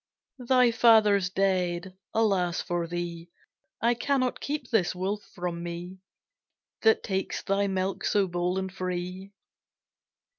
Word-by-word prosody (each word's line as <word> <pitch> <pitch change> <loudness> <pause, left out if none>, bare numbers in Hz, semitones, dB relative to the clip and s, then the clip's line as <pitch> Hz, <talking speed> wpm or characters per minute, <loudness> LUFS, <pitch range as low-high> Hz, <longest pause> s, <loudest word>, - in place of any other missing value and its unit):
Thy 250 -1 +4
father's 215 -5 +5
dead, 185 -1 0 0.2
Alas 195 -6 +1
for 175 -1 -2
thee: 170 0 -5 0.5
I 235 +1 +4
cannot 255 +1 0
keep 285 -3 -4
this 185 -6 +2
wolf 195 +3 -2
from 175 -1 -3
me, 175 +2 -6 0.8
That 220 -1 +4
takes 190 -1 -2
thy 200 +1 +1
milk 190 0 -2
so 205 -1 +2
bold 175 0 -1
and 190 -1 -3
free. 185 +1 -4
190 Hz, 120 wpm, -27 LUFS, 175-215 Hz, 0.8 s, father's